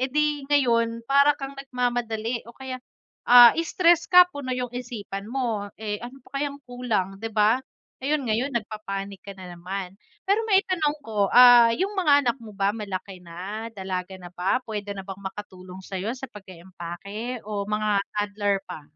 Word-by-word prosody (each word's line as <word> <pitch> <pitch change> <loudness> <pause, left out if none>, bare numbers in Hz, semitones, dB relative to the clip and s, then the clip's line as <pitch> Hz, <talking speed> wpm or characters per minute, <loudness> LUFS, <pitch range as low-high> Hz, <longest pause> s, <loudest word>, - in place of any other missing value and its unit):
edi 290 +1 0
ngayon, 230 -5 +2
para 280 +3 +4
kang 275 -1 -6
nagmamadali 240 -3 -2
o 235 - -13
kaya, 260 -1 -6 0.5
ah, 240 -1 +10
stress 340 0 +3
ka 360 0 +9
puno 285 -4 -7
na 255 - -1
yung 250 -1 -4
isipan 220 -5 -6
mo 230 -5 -2
eh, 210 -1 -4
ano 245 +2 -10
pa 275 +1 -5
kayang 285 -1 -2
kulang 225 -6 -2
di 225 - -3
ba? 220 +3 +3 0.4
Ngayon-ngayon 270 -3 0
nag-papanic 200 -4 -5
ka 200 - -7
na 190 -2 -11
naman, 185 +2 -6 0.3
pero 425 +3 +2
ma-itanong 370 -7 +2
ko 210 -7 -1
ah, 245 -2 +8
yung 385 - -1
mga 300 -7 +5
anak 240 - +2
mo 220 -2 -10
ba 200 +1 0
malaki 195 -3 -6
na, 195 +7 -6
dalaga 190 -2 -5
na 175 - -9
ba, 190 +8 0
pwede 205 -2 -4
na 200 - -7
bang 195 0 -8
makatulong 190 -2 -8
sayo 190 +3 -4
sa 265 +1 -8
pag-pake 190 +4 -8
o 205 -1 -3
mga 210 +1 -1 0.3
toddler 205 -1 0
pa? 155 - -7
225 Hz, 165 wpm, -25 LUFS, 200-260 Hz, 0.5 s, ah